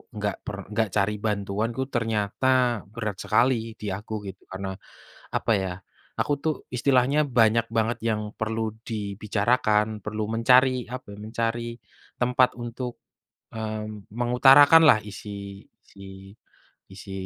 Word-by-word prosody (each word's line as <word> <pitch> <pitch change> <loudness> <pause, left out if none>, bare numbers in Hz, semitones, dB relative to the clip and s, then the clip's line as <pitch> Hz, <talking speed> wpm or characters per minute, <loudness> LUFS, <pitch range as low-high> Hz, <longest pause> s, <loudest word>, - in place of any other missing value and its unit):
nggak 105 -2 -2
per 100 - -4 0.2
nggak 110 -2 +1
cari 105 0 +2
bantuan 105 +1 -1
tuh 130 - 0
ternyata 110 0 -1 0.5
berat 110 -4 -4
sekali 130 +3 +3 0.3
di - - -6
aku 105 +2 -9
gitu 95 0 -9
karena 95 +1 -4 0.7
apa - - -1
ya 95 - -2 0.5
aku 145 - +1
tuh 160 - +2 0.2
istilahnya 130 +3 +3 0.2
banyak 115 0 +4
banget 115 +2 +1
yang 110 -1 0 0.2
perlu 110 +1 -2 0.3
dibicarakan, 105 +1 +1 0.2
perlu 105 0 -3
mencari 125 +3 +5 0.3
apa, 130 -4 -10 0.2
mencari 115 +1 -2 0.6
tempat 125 +1 +3
untuk, 120 +1 -5 0.6
mmm, 110 -2 -5
mengutarakanlah 135 +3 +7
isi 105 +1 -9 0.7
isi 100 - -11 0.9
isi 95 +1 -10
110 Hz, 120 wpm, -25 LUFS, 105-125 Hz, 0.9 s, mengutarakanlah